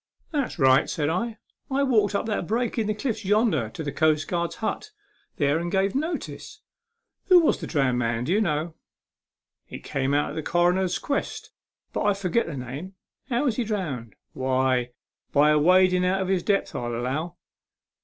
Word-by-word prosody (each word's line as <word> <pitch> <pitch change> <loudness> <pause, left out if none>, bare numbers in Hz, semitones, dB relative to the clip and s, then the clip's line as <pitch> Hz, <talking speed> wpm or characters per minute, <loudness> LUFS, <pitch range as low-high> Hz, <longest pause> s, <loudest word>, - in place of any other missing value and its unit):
" - - -42
That's 285 -9 -2
right," 130 -3 +4
said 150 -1 -1
I. 225 +7 -2 0.2
" - - -66
I 275 +1 +1
walked 215 -6 +2
up - - 0
that 210 -6 -2
break 235 +2 -1
in 215 - 0
the 215 - 0
cliffs 220 -1 -3
yonder 195 - +2
to 160 - -7
the 145 - -3
coastguard's 155 +3 0
hut 230 - -3 0.5
there 145 +1 +1
and 170 +1 -3
gave 195 0 +1
notice. 315 +5 -4 0.6
Who 365 -2 +7
was 320 - +2
the - - -6
drowned 135 -5 +1
man, 115 -1 -1
do 155 - -2
you 210 - +3
know?" 160 -3 -1 1.0
"It - - -9
came 135 0 -1
out 145 - +1
in - - -8
the 160 - -2
cronner's 175 +3 +1
'quest, 280 - -3 0.4
but - - -1
I 205 -1 +2
forget 195 +3 0
the 155 -4 -5
name." 140 +10 -7 0.2
" - - -43
How 245 +2 +1
was 245 -6 0
he 245 - +1
drowned? 160 - -4
" - - -65
" - - -48
Why, 130 -1 +1 0.4
by 150 +1 +5
awading 180 +4 +4
out 190 +1 +1
of 185 - -4
his 190 -2 +2
depth, 200 +2 0
I 120 - -3
allow." 130 +9 -3
175 Hz, 195 wpm, -25 LUFS, 145-210 Hz, 1.0 s, Who